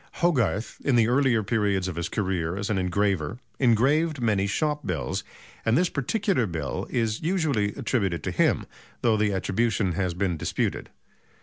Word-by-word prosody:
Hogarth 125 - 0
in 135 - +2
the 115 -2 +4
earlier 125 -3 +3
period 100 -3 +1
of 90 - -4
his 85 0 -3
career 90 -3 -1
as 100 +2 -2
an 100 - +1
engraver 95 0 0 0.2
engraved 140 +6 +3
many 105 -5 +1
shop 150 +7 -1
bills, 85 -5 -2 0.4
and 115 - +3
this 175 +1 +2
particular 180 - 0
bill 80 -6 -4
is 115 -3 -1
usually 155 - 0
attributed 105 - -1
to - - -2
him, - - +2 0.4
though 115 -2 +4
the 105 -1 +1
attribution 100 +1 0
has 90 0 -1
been 90 -2 0
disputed. - - -2
105 Hz, 160 wpm, -26 LUFS, 95-130 Hz, 0.4 s, the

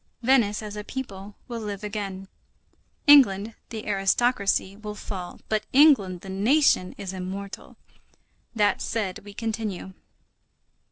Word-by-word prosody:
Venice, 230 -5 +3
as 210 -1 -7
a 210 - -5
people, 205 -5 -7
will 235 -2 -5
live 210 -2 -5
again; 200 -2 -5 0.8
England, 230 -8 +6 0.2
the 220 -2 -6
aristocracy, 200 0 +1
will 210 0 -7
fall, 185 -4 -7
but 215 -1 -1
England, 255 - +5
the - - -11
nation, 205 -1 +2
is 190 -1 -6
immortal. 190 +1 -7 0.8
That 210 -2 +2
said, 205 -5 -2
we 205 0 -12
continue. 215 -4 -4
205 Hz, 120 wpm, -25 LUFS, 195-225 Hz, 0.8 s, England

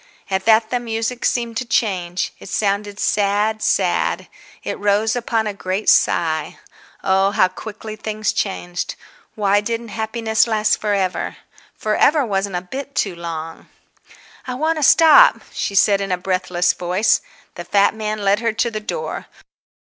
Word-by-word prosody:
At 190 0 -1
that 220 0 +4
the 245 - +1
music 230 +1 -3
seemed 235 -2 -1
to 255 - -1
change; 185 -7 -1
it - - -11
sounded 200 0 -1
sad, 210 +2 +1
sad; - - 0 0.4
it - - -4
rose 210 +2 +1
upon 230 -2 -1
a 210 - -2
great 195 +1 -3
sigh. 160 -2 +2 0.5
Oh, 190 +1 +3
how 190 -2 +3
quickly 215 +3 -8
things 215 0 -2
changed! 175 -3 -3 0.4
Why 205 -1 +2
didn't 230 +2 -4
happiness 220 +1 0
last 215 -1 +2
for 210 -1 +1
ever? 190 -2 -2 0.4
For 215 0 -1
ever 295 -2 +3
wasn't 195 -3 -2
a 175 - -1
bit 270 +9 -7
too 195 -4 0
long. 165 -1 -7 0.8
"I 255 - -3
want 315 +4 0
to - - -1
stop," 330 - +7
she 200 - -3
said 200 0 +4
in 195 -1 -3
a 180 - +1
breathless 180 -1 0
voice. 180 +5 +1 0.3
The - - -7
fat 200 0 +3
man 215 -1 -4
led 200 +1 +3
her 230 -1 -1
to 235 +1 0
the 215 - -3
door. 470 - -5
210 Hz, 160 wpm, -20 LUFS, 195-225 Hz, 0.8 s, stop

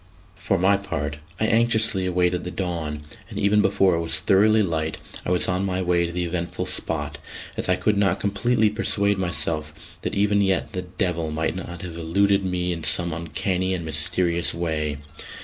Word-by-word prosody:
For 90 +1 0
my 95 +3 +4
part, 75 -7 -4 0.2
I 110 - +2
anxiously 110 -4 +2
awaited 90 0 +1
the 90 - -3
dawn; 85 -5 -3 0.3
and - - -8
even 105 +1 +3
before 95 -2 +3
it 85 - +1
was 80 -1 +2
thoroughly 105 +5 +4
light 80 -3 -1 0.3
I - - 0
was 90 0 +2
on 90 +1 0
my 95 -1 -1
way 85 -1 +2
to - - -6
the 90 0 -2
eventful 85 +1 -3
spot, 75 -5 -2 0.4
as - - -3
I 90 - +4
could 105 +2 +1
not 100 -1 +2
completely 110 +2 +2
persuade 100 -2 +1
myself 80 -4 -3
that - - -3
even 100 0 +3
yet 95 -2 +1
the 90 - -2
"devil" 90 -3 -1
might 80 +2 -1
not 90 -2 -7
have 85 -2 -6
eluded 100 +4 +2
me 90 -1 -1
in 85 -2 -6
some 85 +1 +2
uncanny 90 +3 -1
and 85 -2 -5
mysterious 85 +3 +1
way. 80 -4 -2
90 Hz, 185 wpm, -24 LUFS, 85-100 Hz, 0.4 s, my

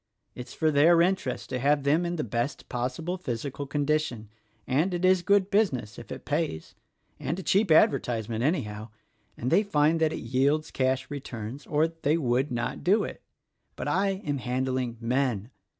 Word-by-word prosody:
It's 125 0 -9
for 155 -1 +2
their 160 +4 +5
interest 190 +2 -1
to 125 - -1
have 145 +2 +2
them 155 +5 +2
in 175 - -2
the 155 - -2
best 120 +5 -3
pos 125 0 -3
sible 175 +3 -4
physical 135 +1 -4
condition, 145 -6 -1 0.4
and 155 +8 +1
it 175 +1 0
is 185 -1 +4
good 200 +1 +2
business 130 - 0
if 120 - -12
it 130 - -7
pays 150 - -2 0.2
— - - -42
and 165 - -3
a 190 - -5
cheap 200 +2 +2
advertisement, 120 -7 +2
anyhow: 110 -8 -1 0.5
and 125 - -2
they - - +5
find 160 -5 +2
that 160 -1 +2
it - - -5
yields 140 +6 +1
cash 130 +1 0
returns 130 -2 -6
or 155 +2 +2
they 165 -1 0
would 130 -1 0
not 120 0 -3
do 200 +5 +3
it. - - -7 0.5
But - - -5
I 195 0 0
am 145 -2 -1
handling 125 -1 -2
men. 120 -2 -1
140 Hz, 180 wpm, -27 LUFS, 125-165 Hz, 0.5 s, their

